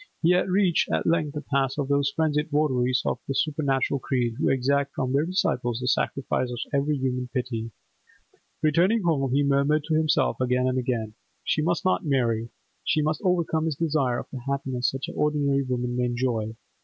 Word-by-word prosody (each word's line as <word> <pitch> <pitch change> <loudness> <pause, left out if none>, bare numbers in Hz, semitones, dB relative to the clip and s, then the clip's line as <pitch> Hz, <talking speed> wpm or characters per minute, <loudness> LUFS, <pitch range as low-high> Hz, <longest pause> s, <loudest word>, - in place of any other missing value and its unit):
He 165 - +5
had 180 +1 +2
reached 185 -2 +2
at - - 0
length 155 -3 +1
the 150 - -3
pass 135 -1 0
of 140 -2 -1
those 140 0 +1
frenzied 155 -1 +1
votaries 130 -4 +1
of - - -1
a 135 - -1
supernatural 140 -3 0
creed 125 -2 -1
who - - +2
exact 140 +1 +1
from 130 0 -1
their 145 +4 +2
disciples 120 - 0
the 125 - -3
sacrifice 130 0 0
of 120 - -5 0.2
every 140 +1 +1
human 125 -1 -2
piety. 115 -2 -3 0.9
Returning 180 +8 +3
home, 140 -6 +1
he 140 +2 +3
murmured 140 +2 +2
to 160 - -2
himself 155 -3 +2
again 125 0 +1
and 130 0 +1
again, 115 -4 -2 0.3
'She 155 - 0
must 170 +4 0
not 185 - +2
marry. 120 -6 0 0.3
She 155 - +1
must 155 0 -1
overcome 170 -3 +1
this 160 -3 -1
desire 145 -6 0
of - - -5
a 130 - -4
happiness 130 -3 -1
such 135 0 -5
as - - -7
ordinary 145 -2 +1
women 125 -2 -2
may 125 0 +1
enjoy. 120 -3 -1
140 Hz, 190 wpm, -25 LUFS, 125-155 Hz, 0.9 s, He